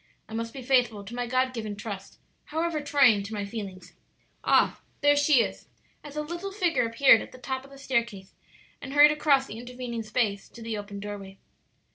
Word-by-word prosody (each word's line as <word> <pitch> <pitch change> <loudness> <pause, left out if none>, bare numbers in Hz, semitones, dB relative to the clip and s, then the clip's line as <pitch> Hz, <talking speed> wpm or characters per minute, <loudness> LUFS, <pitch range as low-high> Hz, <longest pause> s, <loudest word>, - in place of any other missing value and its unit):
I 220 - -11
must 230 0 -3
be 265 0 -8
faithful 245 -5 +2
to 200 +4 -10
my 245 0 -3
God 255 +1 +1
given 215 -3 -4
trust, 200 -2 -7 0.3
however 320 0 -1
trying 280 -8 +4
to 210 +2 -6
my 205 -1 -3
feelings. 200 -3 -7 0.5
Ah, - - +3 0.2
there 290 0 +5
she 285 -4 +5
is!" - - -7 0.4
as 295 -1 -10
a 300 - -2
little 345 +5 -5
figure 355 - +1
appeared 230 0 +6
at - - -9
the - - -12
top 260 +1 -4
of 275 - -15
the 275 - -13
staircase 235 -8 -2 0.5
and 270 -1 -7
hurried 295 +1 +8
across 290 -3 +3
the 225 -3 -8
intervening 245 -1 -5
space 215 -2 -1
to 235 - -12
the 225 -1 -3
open 205 -1 -6
doorway. 200 -1 -7
245 Hz, 195 wpm, -27 LUFS, 215-280 Hz, 0.5 s, hurried